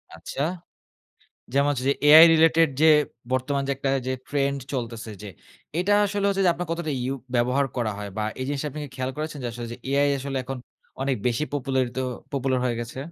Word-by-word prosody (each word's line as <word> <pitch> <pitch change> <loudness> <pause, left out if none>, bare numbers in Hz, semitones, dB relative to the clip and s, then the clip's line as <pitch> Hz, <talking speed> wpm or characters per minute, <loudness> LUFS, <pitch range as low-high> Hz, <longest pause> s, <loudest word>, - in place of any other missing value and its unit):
আচ্ছা। 135 - -6 1.1
যেমন 140 +1 +3
হচ্ছে 130 -2 -2
যে - - +2
AI 155 +2 +10
রিলেটেড 165 0 +5
যে 160 - +6 0.5
বর্তমান 140 +2 0
যে - - +2
একটা 135 0 -2 0.2
যে 130 - 0 0.2
trend 140 -1 0 0.2
চলতেছে 115 -4 -4
যে, 105 - -7 0.5
এটা 195 +3 +2
আসলে 200 0 -2
হচ্ছে 195 -1 +1
যে - - +6
আপনার 175 -1 -5
কতটা 165 -2 -2
ইউ 130 +2 -1 0.2
ব্যবহার 125 +4 +2
করা 110 -3 0
হয় 105 -1 -5
বা 110 - -1 0.2
এই - - -1
জিনিসটা 145 +1 -2
আপনি 150 +2 -7
কি - - -8
খেয়াল 130 0 -2
করেছেন? 155 -1 -4
যে - - -2
আসলে 120 0 -6 0.2
এআই 140 +1 +3
আসলে 135 0 -4
এখন 135 0 -5 0.4
অনেক 135 -1 0
বেশি 120 +5 +1
পপুলারিত 130 -2 -1 0.4
popular 135 -1 0
হয়ে 120 -2 0
গেছে? 120 +2 -7
140 Hz, 190 wpm, -25 LUFS, 125-150 Hz, 1.1 s, AI